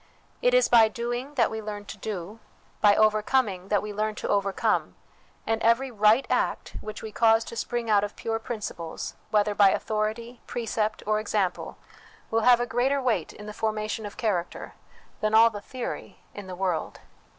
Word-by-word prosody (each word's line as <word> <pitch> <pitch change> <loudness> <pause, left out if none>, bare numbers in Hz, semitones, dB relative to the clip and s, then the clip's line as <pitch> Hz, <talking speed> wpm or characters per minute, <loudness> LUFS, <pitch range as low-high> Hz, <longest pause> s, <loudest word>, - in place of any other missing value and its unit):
It - - +3
is - - +5
by 230 -2 +6
doing, 240 +5 -4
that 235 -4 +2
we 220 0 -4
learn 205 -1 -6
to 205 - -8
do; 205 +1 -6 0.4
by 205 -1 +6
overcoming, 215 -2 +2
that 205 0 +1
we 210 0 -5
learn 215 +1 -1
to - - -4
over 200 -1 +1
come; - - 0 0.5
and 225 0 0
every 240 +4 +2
right 215 +4 +4
act - - -1
which 215 0 -7
we 220 - -6
cause 225 +1 +4
to 230 - -9
spring 235 0 -3
out 205 -2 +4
of 205 - -4
pure 225 0 -2
principles, 210 -8 -5 0.2
whether 210 -1 +2
by 200 -1 +6
authority, 220 +4 -2
precept, 220 -2 -2
or 215 0 +1
example, 205 -4 -2 0.5
will 225 0 +2
have 245 +1 +6
a 240 - 0
greater 250 +4 +1
weight 250 -4 0
in 210 - -11
the 210 - -7
formation 215 0 -2
of 205 - -12
character 190 -7 -2 0.5
than 215 0 +1
all 230 +1 +7
the 205 -1 -7
theory 250 +1 -6 0.2
in 205 -2 -9
the 185 - -6
world." 180 -3 -2
215 Hz, 185 wpm, -26 LUFS, 205-230 Hz, 0.5 s, all